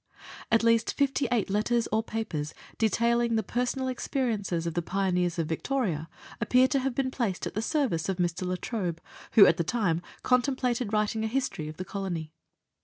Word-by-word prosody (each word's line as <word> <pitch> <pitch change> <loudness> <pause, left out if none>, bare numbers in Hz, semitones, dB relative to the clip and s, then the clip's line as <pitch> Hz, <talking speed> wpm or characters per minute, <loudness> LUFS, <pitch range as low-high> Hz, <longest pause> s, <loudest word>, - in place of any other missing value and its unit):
At 225 +1 +4
least 230 0 +3
58 265 -5 +1
letters 225 +3 +1
or 220 +1 +2
papers, 170 -10 -4 0.2
detailing 235 +1 +2
the 220 - +1
personal 250 +2 -1
experiences 225 -9 -1
of 170 - -2
the 175 - 0
pioneers 180 -1 0
of 165 - 0
Victoria, 165 - -1 0.3
appear 255 +1 +5
to 275 - +2
have 260 -1 -2
been 265 -1 0
placed 225 -9 -2
at - - -4
the 215 - -1
service 225 - 0
of 190 - -1
Mr. 175 0 -1
La 185 - 0
Trobe, 180 -8 -3 0.3
who 205 - +9
at 165 - +4
the 170 - +1
time 175 -4 0 0.2
con 250 0 +4
templated 250 -4 -1
writing 215 +1 0
a - - +1
history 225 - -2
of 155 - -9
the 185 - -5
Colony. 175 -7 -4
220 Hz, 180 wpm, -28 LUFS, 180-245 Hz, 0.3 s, who